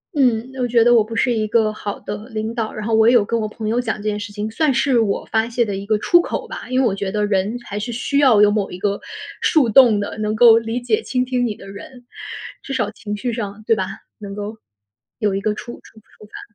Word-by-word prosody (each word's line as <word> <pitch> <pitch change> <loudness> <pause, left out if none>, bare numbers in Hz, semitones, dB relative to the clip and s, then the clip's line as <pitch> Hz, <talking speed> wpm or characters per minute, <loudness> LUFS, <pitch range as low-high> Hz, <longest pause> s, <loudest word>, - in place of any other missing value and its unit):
嗯， 250 -3 +1
我 250 - +1
觉 235 -1 +4
得 240 +1 +5
我 225 - +5
不 225 +2 -8
是 250 - +2
一 215 -2 -1
个 220 -1 +2
好 205 -1 -6
的 210 +2 -7
领 220 -1 -4
导。 225 -2 -3
然 215 0 -5
后 225 - +2
我 220 0 +5
也 240 - +6
有 240 -4 +5
跟 230 +3 -1
我 215 - -2
朋 215 0 -6
友 235 +2 +1
讲 235 -3 -2
这 205 - -10
件 210 -1 -1
事 205 0 -7
情， 210 +1 -4
算 285 +5 +1
是 260 -1 +2
我 210 -3 0
发 220 0 +1
泄 235 0 0
的 205 -2 -3
一 195 +1 -6
个 215 +1 +1
出 345 +10 +4
口 - - -4
吧。 - - -8
因 255 0 +1
为 - - +2
我 195 - -1
觉 195 -1 -3
得 210 0 0
人 205 +3 0
还 205 - -6
是 210 +3 -4
需 245 +4 -2
要 250 -7 +5
有 210 - +6
某 205 -1 -1
一 180 - -8
个 200 +1 -1 0.4
树 300 -8 +3
洞 225 -2 +6
的， 205 - -4
能 215 0 -1
够 225 0 +7
理 230 +2 -2
解 430 - 0
倾 250 -1 0
听 250 -1 0
你 220 -3 -2
的 - - -13
人。 245 +5 -11 0.6
至 275 - -6
少 210 - 0
情 210 -1 -6
绪 240 +4 -3
上， 215 -2 -5
对 225 - +4
吧？ 190 -3 -1 0.3
能 200 -2 -8
够， 210 +2 -6 0.6
有 210 -4 0
一 195 - -2
个 210 +1 0
触- 240 +3 -8
触 220 - -17
触 215 - -19
发。 220 +2 -12
220 Hz, 290 characters per minute, -20 LUFS, 210-240 Hz, 0.6 s, 够